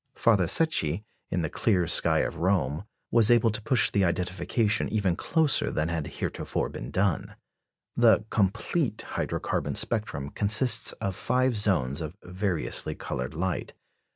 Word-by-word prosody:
Father 100 -7 +3
Secchi, 100 - +1 0.3
in 90 - -1
the - - 0
clear 95 -6 +1
sky - - +3
of - - -3
Rome, 85 -2 0 0.3
was 115 -1 +5
able 115 -1 +4
to 110 - -3
push 115 +2 +2
the 100 - +2
identification 95 +5 0
even 100 -5 0
closer 160 - +2
than 80 +2 -1
had 80 -4 -3
heretofore - - -3
been - - -7
done. 95 -3 -1 0.6
The 115 -3 +4
complete 110 - 0
hydro - - -3
carbon - - -2
spectrum 105 -11 -1
consists 110 +3 +2
of 95 -2 -4
five 125 +4 +1
zones 85 -10 +1
of 80 +4 -6
variously 90 -1 -2
coloured 65 +4 -5
light. 90 +2 -3
100 Hz, 145 wpm, -27 LUFS, 85-115 Hz, 0.6 s, was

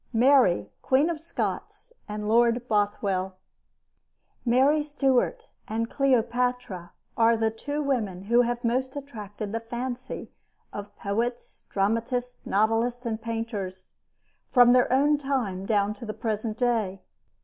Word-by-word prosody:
MARY 230 - +4
QUEEN 280 +6 +3
OF 325 - -4
SCOTS 340 +7 -4 0.2
AND 210 0 -4
LORD 235 +2 +3
BOTHWELL 200 -3 0 1.1
Mary 265 +5 +4
Stuart 295 - 0 0.2
and 225 +1 -2
Cleopatra 245 -8 0 0.2
are 230 0 +4
the 220 0 +1
two 290 +7 -4
women 215 -10 -1
who 235 +4 +4
have 240 0 -1
most 260 +3 0
attracted 215 -7 -6
the 230 - -1
fancy 245 +2 -5 0.4
of 205 0 -8
poets, 235 +5 -3
dramatists, 230 +5 -1
novelists, 225 +4 +1
and 225 -1 -2
painters, 210 -5 -5 0.6
from 245 -1 +6
their 250 -1 +4
own 290 +3 +4
time 235 -10 -2
down 205 -1 +2
to 210 +3 -10
the 215 - -4
present 215 0 -2
day. 225 -6 0
235 Hz, 125 wpm, -26 LUFS, 210-255 Hz, 1.1 s, from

